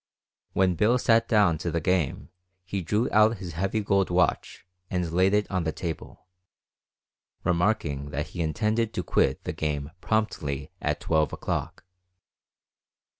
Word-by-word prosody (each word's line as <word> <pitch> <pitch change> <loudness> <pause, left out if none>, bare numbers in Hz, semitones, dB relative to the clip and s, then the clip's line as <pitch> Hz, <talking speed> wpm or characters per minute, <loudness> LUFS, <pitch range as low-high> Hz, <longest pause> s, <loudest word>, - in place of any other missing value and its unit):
When 95 -1 +3
Bill 105 +9 +3
sat 115 -1 +3
down 100 -8 +3
to 85 - -2
the 85 +1 0
game 85 -3 0 0.4
he 95 +1 -3
drew 105 +8 0
out 110 +1 +4
his 90 -3 -7
heavy 95 +6 -1
gold 100 -2 +1
watch 90 0 0 0.2
and 90 -3 -1
laid 95 +3 +3
it 105 0 +2
on 95 -3 0
the 80 - -1
table, 85 +2 -6 1.2
remarking 85 -6 0
that 75 +1 -3
he 85 - -5
intended 110 +8 0
to 90 - -1
quit 65 -4 +1
the - - -3
game 75 -1 -3
promptly 75 -11 -1
at - - -1
12 80 -3 +1
o'clock. - - -3
90 Hz, 145 wpm, -26 LUFS, 80-105 Hz, 1.2 s, out